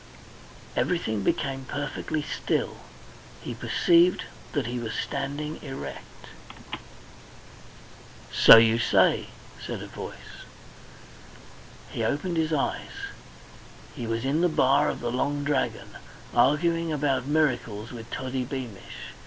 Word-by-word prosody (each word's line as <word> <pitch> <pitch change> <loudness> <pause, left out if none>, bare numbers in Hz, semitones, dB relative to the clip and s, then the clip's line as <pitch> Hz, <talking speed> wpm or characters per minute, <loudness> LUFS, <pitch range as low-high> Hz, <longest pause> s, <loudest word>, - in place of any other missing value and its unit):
Everything 110 - 0
became 135 +6 -1
perfectly 145 +2 -3
still. - - -1 0.6
He - - -6
perceived 175 +1 +3 0.3
that 145 -5 0
he 120 +1 -3
was 115 -2 -4
standing 145 +2 -3
erect. 135 0 -8 2.1
"So - - +10
you 115 0 +5
say," 110 - +3 0.4
said - - -5
a - - -7
voice. - - -9 1.5
He - - -2
opened 170 +4 -1
his 160 0 +1
eyes. 150 -3 -2 0.8
He 115 - -5
was 115 +2 -2
in 145 +5 +1
the 175 - +4
bar 145 0 +3
of - - -4
the 120 0 -2
Long 145 +3 -1
Dragon, 140 -2 -1 0.4
arguing 165 +3 +3
about 140 -3 0
miracles 125 -8 0
with 120 -1 -9
Toddy 130 +1 -3
Beamish. 125 -6 -7
135 Hz, 110 wpm, -27 LUFS, 120-150 Hz, 2.1 s, So